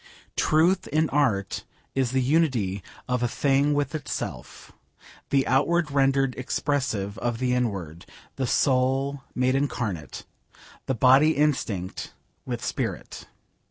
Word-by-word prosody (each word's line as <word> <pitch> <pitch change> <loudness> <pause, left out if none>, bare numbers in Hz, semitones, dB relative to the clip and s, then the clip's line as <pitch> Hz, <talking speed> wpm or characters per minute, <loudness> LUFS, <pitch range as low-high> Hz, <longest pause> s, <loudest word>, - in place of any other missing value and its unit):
Truth 170 +5 +3
in 155 +1 +1
art 120 -10 +1 0.3
is 135 -2 +1
the 130 +1 +1
unity 125 - +1 0.3
of 125 -1 0
a 120 - +2
thing 140 +3 +2
with 145 +2 -1
itself: 145 -6 -6 0.6
the 135 -1 +2
outward 150 +4 +2
rendered 135 -1 +2
expressive 125 -7 -1
of 120 -1 -1
the 125 0 0
inward: 95 -10 -2 0.3
the 130 -2 -1
soul 135 +2 +1
made 125 +1 +2
incarnate: 110 - -2 0.6
the 135 - 0
body 135 +6 +5
instinct 115 -11 -1 0.3
with - - -3
spirit. - - -4
130 Hz, 120 wpm, -25 LUFS, 120-145 Hz, 0.6 s, body